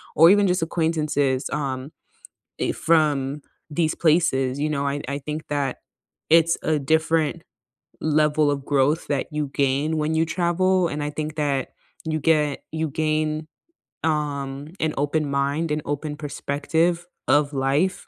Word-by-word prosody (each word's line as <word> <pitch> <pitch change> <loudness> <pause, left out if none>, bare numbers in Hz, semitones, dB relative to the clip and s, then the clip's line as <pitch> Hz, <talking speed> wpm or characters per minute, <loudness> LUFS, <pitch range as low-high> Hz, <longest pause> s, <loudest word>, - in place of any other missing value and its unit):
or 165 +2 +8
even 200 +1 +5
just 180 -1 +1
acquaintances, 155 -5 0
um, 135 -1 -3 0.7
eh, - - 0
from 150 -3 +1 0.3
these 160 +1 0
places, 145 -5 +2
you 150 +1 0
know, 140 -2 -1
I 140 +1 -2
I 140 +1 -2
think 150 +2 -6
that 140 -3 -1 0.5
it's 165 +1 +5
a 155 -1 +2
different 160 +2 +1 0.6
level 150 -1 +2
of 140 -1 -3
growth 145 +2 +1
that 145 -2 0
you 150 -2 -2
gain 140 +3 +1
when 155 +1 0
you 160 +1 +3
travel, 180 +2 +1
and 150 -1 -4
I 145 - -2
think 155 +1 -5
that 140 -4 0 0.4
you 155 -1 -1
get 150 -2 +2
you 160 0 -1
gain, 155 +1 -1 0.6
um, 145 -3 -2
an 160 -1 +1
open 145 +1 0
mind 140 +4 0
and 150 0 0
open 145 +1 -3
perspective 160 +4 -1 0.2
of 145 0 +3
life 140 +7 0
150 Hz, 145 wpm, -23 LUFS, 140-160 Hz, 0.7 s, or